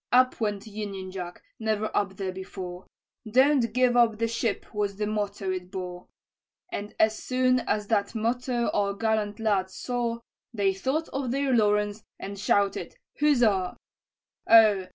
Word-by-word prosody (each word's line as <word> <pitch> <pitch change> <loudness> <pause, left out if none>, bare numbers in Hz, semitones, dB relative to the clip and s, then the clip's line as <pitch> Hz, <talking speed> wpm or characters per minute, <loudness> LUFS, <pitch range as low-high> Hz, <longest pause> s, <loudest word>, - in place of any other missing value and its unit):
"Up 255 -1 +4
went 210 -1 -1
union 200 -3 -6
jack, 180 -2 -7 0.2
never 215 -1 -1
up 195 -1 0
there 190 -2 -2
before, 185 -1 -7 0.4
'Don't 260 0 +4
give 250 +1 +3
up 235 -3 +4
the 230 +1 +1
ship' 230 -1 -2
was 205 -1 -1
the 210 +1 -2
motto 205 -2 -2
it 180 -1 -4
bore; 180 -2 -6 0.6
And 205 +1 -5
as 220 0 +3
soon 255 0 +2
as 210 -3 -1
that 205 0 +1
motto 240 +2 0
our 200 -1 +1
gallant 215 -1 0
lads 195 -4 0
saw, 240 -2 -2 0.3
They 200 -2 +2
thought 265 +12 -1
of 270 -2 -3
their 270 +1 +1
Lawrence, 210 -1 +2
and 200 0 -7
shouted 200 - +1 0.2
huzza! 235 -11 +3 0.7
"Oh! 215 -5 +7
210 Hz, 150 wpm, -27 LUFS, 195-235 Hz, 0.7 s, Oh